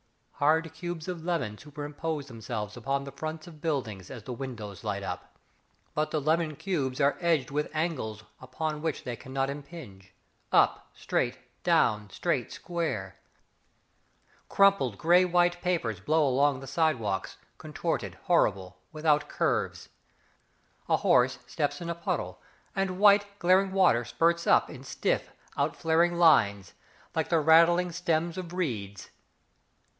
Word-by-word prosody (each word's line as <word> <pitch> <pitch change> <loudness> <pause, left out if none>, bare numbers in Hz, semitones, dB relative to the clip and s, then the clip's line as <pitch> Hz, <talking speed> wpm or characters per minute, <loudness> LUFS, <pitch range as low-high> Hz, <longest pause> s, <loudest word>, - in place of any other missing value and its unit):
Hard 160 +2 +2
cubes 165 -1 -6
of 175 -3 -5
lemon 165 -12 -1
Superimpose 150 0 -5
themselves 110 -4 -6
upon 135 +3 -2
the 140 - -8
fronts 155 +3 -6
of 155 -4 -13
buildings 125 - -3
As 125 -5 -8
the 125 - -6
windows 115 -7 -7
light - - -3
up. - - -7 0.6
But 155 0 0
the 155 - -1
lemon 155 +1 +1
cubes 140 -8 -2
are 140 0 +3
edged 160 -7 +1
with 150 +1 -1
angles 135 -10 -2 0.2
Upon 150 +4 -4
which 160 -2 -2
they 120 - -4
cannot 135 +3 -3
impinge. 140 - -11 0.4
Up, - - +3
straight, - - -1 0.2
down, 105 -1 +2
straight - - -1
square. 135 - -4 1.3
Crumpled 195 - +3
grey 175 +3 +5
white 175 0 +2
papers 145 - -1
Blow 155 +9 +2
along 135 +1 +2
the - - -8
side 155 +3 +2
walks, 100 -3 -3 0.2
Contorted, - - -3
horrible, 95 -1 +1
Without 155 -1 +1
curves. - - -1 1.0
A - - +4
horse 125 +1 +3
steps 145 +2 -2
in 170 -1 -4
a - - -1
puddle, 170 0 -3 0.3
And 195 -2 -1
white, 205 0 +6
glaring 190 +1 +3
water 185 -11 +4
spurts 170 +8 +1
up - - +5
In - - -10
stiff, - - -1 0.3
outflaring 170 +2 +1
lines, 100 - +4 0.4
Like - - -1
the 165 - +3
rattling 170 +3 +5
stems 170 0 -1
of 175 -2 -7
reeds. 105 - -4
150 Hz, 140 wpm, -28 LUFS, 125-170 Hz, 1.3 s, white